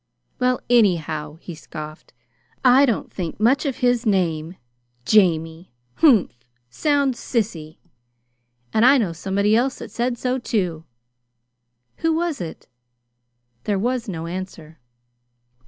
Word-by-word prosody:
"Well, 250 Hz, 0 st, +1 dB
anyhow," 160 Hz, -10 st, +1 dB
he 175 Hz, -, -8 dB
scoffed, 155 Hz, -1 st, -10 dB, 0.5 s
"I 260 Hz, +3 st, +6 dB
don't 230 Hz, -, -2 dB
think 175 Hz, -2 st, -5 dB
much 260 Hz, +7 st, +2 dB
of 270 Hz, -, -3 dB
his 245 Hz, -1 st, +2 dB
name. 175 Hz, -5 st, 0 dB, 0.5 s
'Jamie'! 165 Hz, -3 st, +2 dB, 0.3 s
Humph! 225 Hz, -, +4 dB, 0.3 s
sounds 280 Hz, -, +1 dB
sissy! 170 Hz, -10 st, -3 dB, 1.0 s
And 220 Hz, -, +3 dB
I 265 Hz, +3 st, +7 dB
know 200 Hz, -9 st, 0 dB
somebody 200 Hz, +5 st, +1 dB
else 255 Hz, +3 st, +1 dB
that -, -, -9 dB
said 240 Hz, 0 st, -1 dB
so, 255 Hz, +2 st, -1 dB
too." 180 Hz, -9 st, -2 dB, 1.1 s
"Who 325 Hz, -1 st, +1 dB
was 335 Hz, -, -2 dB
it?" 165 Hz, -2 st, -8 dB, 1.0 s
There 205 Hz, -2 st, 0 dB
was 240 Hz, +2 st, -1 dB
no 165 Hz, -3 st, -5 dB
answer. 170 Hz, -3 st, -7 dB
205 Hz, 120 wpm, -22 LUFS, 165-250 Hz, 1.1 s, I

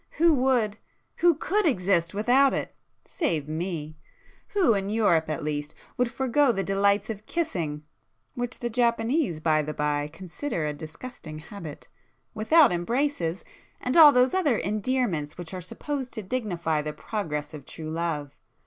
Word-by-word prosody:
—who 335 Hz, 0 st, +4 dB
would, 250 Hz, -6 st, +1 dB, 0.4 s
who 345 Hz, -1 st, +4 dB
could 415 Hz, +7 st, 0 dB
exist 185 Hz, -, +2 dB
without 255 Hz, +6 st, +4 dB
it—save 165 Hz, -, -4 dB
me! 155 Hz, -1 st, -4 dB, 0.6 s
Who, 360 Hz, -, +4 dB
in 195 Hz, -1 st, -1 dB
Europe 190 Hz, -8 st, +2 dB
at 155 Hz, -, -3 dB
least, 150 Hz, 0 st, -3 dB, 0.2 s
would 250 Hz, -1 st, +1 dB
forego 265 Hz, +1 st, +2 dB
the 195 Hz, -3 st, -1 dB
delights 200 Hz, +2 st, +2 dB
of 215 Hz, 0 st, -9 dB
kissing,—(which 190 Hz, -, -5 dB
the 240 Hz, -, -1 dB
Japanese 235 Hz, -, +1 dB
by 155 Hz, -1 st, +2 dB
the 150 Hz, 0 st, -5 dB
by 150 Hz, 0 st, 0 dB
consider 175 Hz, -, -4 dB
a 150 Hz, -, -1 dB
disgusting 155 Hz, +2 st, -9 dB
habit),—without 215 Hz, -, 0 dB
embraces,—and 195 Hz, -, -2 dB
all 315 Hz, -3 st, +10 dB
those 250 Hz, -1 st, +3 dB
other 310 Hz, -11 st, +2 dB
endearments 210 Hz, -, -1 dB
which 175 Hz, 0 st, -8 dB
are 185 Hz, -, -5 dB
supposed 265 Hz, -, -5 dB
to 220 Hz, -, -5 dB
dignify 175 Hz, -8 st, -1 dB
the 150 Hz, 0 st, -4 dB
progress 155 Hz, -10 st, -4 dB
of 150 Hz, -3 st, -8 dB
true 155 Hz, +3 st, -7 dB
love! 160 Hz, -4 st, -3 dB
200 Hz, 140 wpm, -26 LUFS, 155-250 Hz, 0.6 s, all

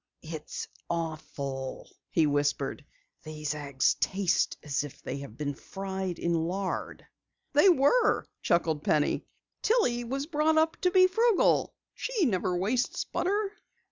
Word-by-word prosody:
"It's 155 Hz, -2 st, -6 dB, 0.2 s
awful," 145 Hz, -5 st, -4 dB, 0.2 s
he 160 Hz, -, +3 dB
whispered. 145 Hz, 0 st, 0 dB, 0.4 s
"These 155 Hz, -1 st, -4 dB
eggs 140 Hz, -3 st, +1 dB
taste 190 Hz, -2 st, +1 dB
as 145 Hz, -1 st, -1 dB
if 145 Hz, -, -9 dB
they 135 Hz, -, -4 dB
had 130 Hz, -5 st, -9 dB
been 145 Hz, -1 st, -2 dB
fried 190 Hz, +2 st, -5 dB
in 170 Hz, -, 0 dB
lard." 180 Hz, +4 st, -2 dB, 0.5 s
"They 300 Hz, +7 st, +7 dB
were," 345 Hz, -, +4 dB, 0.2 s
chuckled 160 Hz, -3 st, +1 dB
Penny. 150 Hz, -1 st, +1 dB, 0.3 s
"Tillie 250 Hz, -, +2 dB
was 270 Hz, +4 st, -2 dB
brought 310 Hz, 0 st, +2 dB
up 320 Hz, 0 st, +3 dB
to 365 Hz, -, +2 dB
be 370 Hz, 0 st, +6 dB
frugal. 445 Hz, +3 st, +3 dB, 0.2 s
She 465 Hz, -8 st, 0 dB
never 185 Hz, -6 st, +1 dB
wastes 220 Hz, +7 st, 0 dB
butter." 400 Hz, +2 st, -1 dB
180 Hz, 130 wpm, -29 LUFS, -, 0.5 s, They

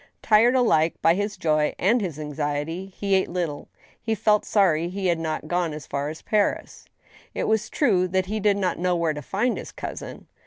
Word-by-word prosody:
Tired 230 Hz, +4 st, +5 dB
alike 170 Hz, -11 st, +3 dB
by 165 Hz, -, +6 dB
his 205 Hz, +2 st, -2 dB
joy 155 Hz, -3 st, +1 dB
and 220 Hz, +6 st, +2 dB
his 175 Hz, -7 st, -4 dB
anxiety, 150 Hz, +4 st, -3 dB
he 195 Hz, +1 st, -3 dB
ate 190 Hz, 0 st, +2 dB
little. 170 Hz, -5 st, -3 dB, 0.3 s
He 225 Hz, -1 st, -1 dB
felt 210 Hz, 0 st, +2 dB
sorry 175 Hz, -5 st, +2 dB
he 195 Hz, +1 st, -4 dB
had 170 Hz, -2 st, +2 dB
not 160 Hz, -1 st, -3 dB
gpne 175 Hz, -1 st, -1 dB
as 150 Hz, -2 st, -8 dB
far 140 Hz, +1 st, -3 dB
as 155 Hz, -, -9 dB
Paris. 210 Hz, -2 st, -1 dB, 0.5 s
It -, -, -1 dB
was 220 Hz, 0 st, 0 dB
true 195 Hz, -11 st, +2 dB
that 185 Hz, +1 st, 0 dB
he 215 Hz, +3 st, -3 dB
did 205 Hz, -1 st, +2 dB
not 185 Hz, -4 st, -1 dB
know 180 Hz, 0 st, +1 dB
where 165 Hz, -2 st, 0 dB
to 150 Hz, -, -6 dB
find 210 Hz, -, -1 dB
his -, -, -8 dB
cousin. -, -, -7 dB
185 Hz, 200 wpm, -24 LUFS, 160-205 Hz, 0.5 s, by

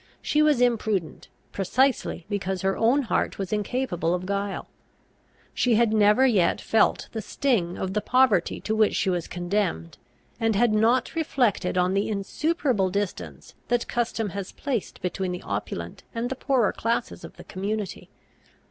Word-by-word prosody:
She 300 Hz, -, +1 dB
was 300 Hz, -5 st, +4 dB
imprudent, 220 Hz, -7 st, 0 dB, 0.2 s
precisely 230 Hz, -2 st, 0 dB
because 190 Hz, -2 st, -3 dB
her 195 Hz, 0 st, +1 dB
own 245 Hz, +6 st, +3 dB
heart 230 Hz, -, -1 dB
was 195 Hz, 0 st, -3 dB
incapable 205 Hz, -6 st, -1 dB
of 180 Hz, 0 st, -5 dB
guile. 200 Hz, 0 st, -3 dB, 0.9 s
She 245 Hz, -3 st, +2 dB
had 225 Hz, -1 st, +3 dB
never 210 Hz, +4 st, +5 dB
yet 205 Hz, -9 st, +3 dB
felt 225 Hz, -, +2 dB
the 220 Hz, -, -4 dB
sting 205 Hz, -7 st, 0 dB
of 190 Hz, 0 st, -3 dB
the 210 Hz, -, 0 dB
poverty 250 Hz, -9 st, +2 dB
to 220 Hz, -, -1 dB
which 220 Hz, -1 st, +3 dB
she 190 Hz, -, +1 dB
was 175 Hz, -2 st, -2 dB
condemned, 175 Hz, -, -2 dB, 0.4 s
and 225 Hz, -2 st, +1 dB
had 230 Hz, +1 st, +3 dB
not 230 Hz, +4 st, +2 dB
reflected 250 Hz, -, 0 dB
on 180 Hz, +1 st, +2 dB
the 200 Hz, +2 st, 0 dB
insuperable 220 Hz, -, 0 dB
distance 200 Hz, 0 st, -4 dB
that 240 Hz, -1 st, 0 dB
custom 230 Hz, -3 st, -1 dB
has 195 Hz, 0 st, -6 dB
placed 250 Hz, -12 st, -4 dB
between 185 Hz, 0 st, -2 dB
the 180 Hz, -, -6 dB
opulent 90 Hz, -4 st, -5 dB
and 235 Hz, +2 st, -2 dB
the -, -, -1 dB
poorer 260 Hz, -5 st, +1 dB
classes 230 Hz, +1 st, -2 dB
of -, -, -11 dB
the -, -, -10 dB
community. 200 Hz, +1 st, -4 dB
210 Hz, 155 wpm, -25 LUFS, 190-240 Hz, 0.9 s, never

